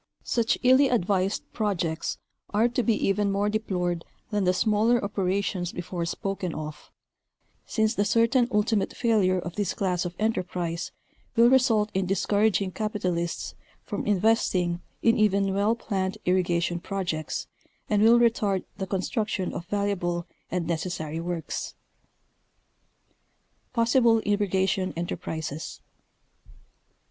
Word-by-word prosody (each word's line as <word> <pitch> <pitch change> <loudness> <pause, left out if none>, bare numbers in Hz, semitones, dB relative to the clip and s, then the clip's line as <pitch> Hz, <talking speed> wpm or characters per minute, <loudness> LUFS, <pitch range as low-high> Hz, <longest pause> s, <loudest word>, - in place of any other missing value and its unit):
© - - -45 0.2
Such 235 -1 +1
illy 260 +2 +6
advised 195 -3 +1
projects 175 -7 -1 0.4
are 220 +3 +4
to 240 +1 0
be 230 -1 +2
even 200 0 +1
more 200 +1 +1
deplored 180 -6 -1 0.3
than 205 -2 +1
the 180 - +4
smaller 215 +5 +3
operations 195 -2 -1
before 175 -1 -4
spoken 185 0 -3
of, 155 -1 -7 0.8
since 220 -1 +1
the 205 - +1
certain 230 +3 +3
ulti 220 -1 +1
mate 200 - -1
failure 210 -6 +3
of 175 0 -5
this 205 -3 -1
class 180 -3 0
of 175 -1 -5
enterprise 180 -5 -2 0.4
will 235 +1 +6
result 225 -5 +3
in 190 -1 0
discouraging 200 0 +1
capitalists 180 -5 -2 0.3
from - - -4
investing 185 -4 +2 0.2
in 230 +1 +4
even 200 -2 +3
well 205 +3 +2
planned 190 -5 -2
irrigation 175 -1 +1
pro 195 +2 -3
jects, 155 -3 -3 0.4
and 210 -1 +2
will 230 +2 +7
retard 215 -5 +2
the 190 -2 -3
construction 195 0 -2
of 170 - -6
valuable 180 -4 -1 0.2
and 175 -1 -1
necessary 165 -1 -3
works. 170 -1 -4 2.0
PossiBLE 230 -1 +4
IRRIGATION 195 -2 +1
ENTERPRISES. 160 -2 -4
195 Hz, 125 wpm, -26 LUFS, 175-215 Hz, 2.0 s, will